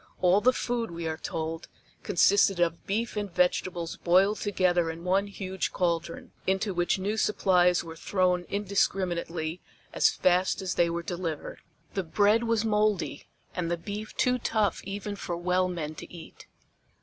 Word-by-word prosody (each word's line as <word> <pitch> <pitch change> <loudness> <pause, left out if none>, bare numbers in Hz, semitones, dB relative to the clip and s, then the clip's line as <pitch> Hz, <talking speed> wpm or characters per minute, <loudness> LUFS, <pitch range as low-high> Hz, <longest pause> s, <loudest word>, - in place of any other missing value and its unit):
All 185 +3 +4
the 255 - +5
food, 240 -2 -2
we 170 -1 -5
are 160 - -2
told, 160 +1 -4 0.3
consisted 195 0 +3
of 170 -1 0
beef 220 +4 -1
and 205 -2 -3
vegetables 175 -1 0
boiled 190 +4 +3
together 180 -4 +1
in 165 +1 -6
one 190 +3 +1
huge 190 -2 -4
caldron, 170 -2 -2 0.2
into 190 +1 +1
which 175 +1 +1
new 205 +3 -2
supplies 180 -5 +3
were 165 -1 -9
thrown 180 0 +1
indiscriminately 180 -4 -1 0.3
as - - +4
fast 185 +1 +2
as 190 -1 -2
they 170 -1 +2
were 170 0 -3
delivered. 170 -3 -4 0.3
The 195 - 0
bread 205 +6 +2
was 230 -1 +1
moldy 210 -3 0 0.3
and 175 -2 -2
the 170 - 0
beef 205 +5 -7
too 250 -1 +2
tough 215 -3 0
even 200 +1 -4
for 175 -3 -4
well 180 +1 +1
men 165 -4 -4
to - - -10
eat. 170 -2 -12
185 Hz, 160 wpm, -28 LUFS, 170-205 Hz, 0.3 s, the